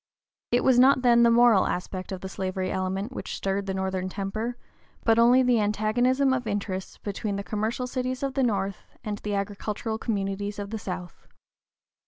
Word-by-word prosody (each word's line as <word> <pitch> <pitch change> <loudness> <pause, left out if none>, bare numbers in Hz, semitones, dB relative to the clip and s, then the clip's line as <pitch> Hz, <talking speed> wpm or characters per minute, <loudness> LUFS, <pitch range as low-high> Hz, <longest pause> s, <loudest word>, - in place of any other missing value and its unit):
It 245 - +2
was 255 -2 +5
not 260 0 +5
then 235 -1 +6
the 235 - +6
moral 235 -4 +5
aspect 185 +1 -4
of 185 -2 -5
the 190 - -5
slavery 185 0 -3
element 190 +4 -2
which - - -5
stirred 195 0 -2
the 190 - -1
northern 190 -1 -2
temper, 215 +5 -3 0.5
but 225 0 +4
only 245 +2 +6
the 245 -2 +3
antagonism 245 +6 +2
of 255 -3 -2
interests 200 -2 -3
between 205 0 -4
the 200 - -3
commercial 220 +4 -2
cities 255 +1 -3
of 275 -1 -1
the 270 - 0
North 200 -5 0 0.3
and 210 -1 -4
the 210 -1 -3
agricultural 210 +2 -3
communities 200 -2 -2
of 200 0 -5
the 220 - -3
South. 180 -3 -7
210 Hz, 180 wpm, -26 LUFS, 195-245 Hz, 0.5 s, then